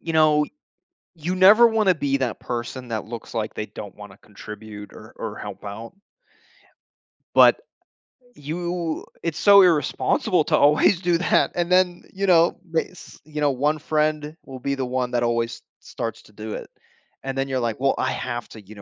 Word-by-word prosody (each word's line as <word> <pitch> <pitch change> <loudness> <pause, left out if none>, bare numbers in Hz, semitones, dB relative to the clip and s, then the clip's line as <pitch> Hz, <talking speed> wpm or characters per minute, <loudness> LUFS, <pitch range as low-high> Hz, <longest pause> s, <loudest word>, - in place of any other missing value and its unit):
you 165 - -4
know, 155 -1 +4 0.7
you 170 +3 -3
never 205 +6 +7
wanna 215 -5 +2
be 140 -3 0
that 130 -4 -2
person 120 +1 -5
that 110 -2 -3
looks 115 0 -8
like 110 -2 -3
they 105 - -4
don't 100 -2 -9
wanna 105 -1 -12
contribute 105 0 -11
or 110 - -13
or 110 -2 -6
help 100 -2 -8
out 105 +3 -8 1.4
but, - - +7 0.8
you 170 +2 -4 0.2
it's 165 -2 -3
so 200 -1 +7
irresponsible 165 -6 +2
to - - +2
always 150 +5 +4
do 175 -2 +1
that, 180 - +2
and 175 0 -1
then, 180 -1 +3
you 195 +1 -2
know 170 -2 +4
bas 165 +2 -5
you 150 -1 -6
know, 145 -1 +3
one 145 +4 0
friend 155 0 -1
will 135 -1 -9
be 140 +2 -2
the 135 -1 -2
one 125 0 -2
that 120 - 0
always 115 0 0
s - - -20 0.2
starts 115 - -6
to 105 - -21
do 110 +1 -7
it. - - -7 0.6
And 135 0 -4
then 135 0 0
you're 130 -1 -1
like, 115 -1 -2
"Well, 135 0 +2
I 130 - 0
have 120 -2 -4
to, 110 - -11
you 100 +1 -14
know, 100 - -12
135 Hz, 185 wpm, -23 LUFS, 115-165 Hz, 1.4 s, never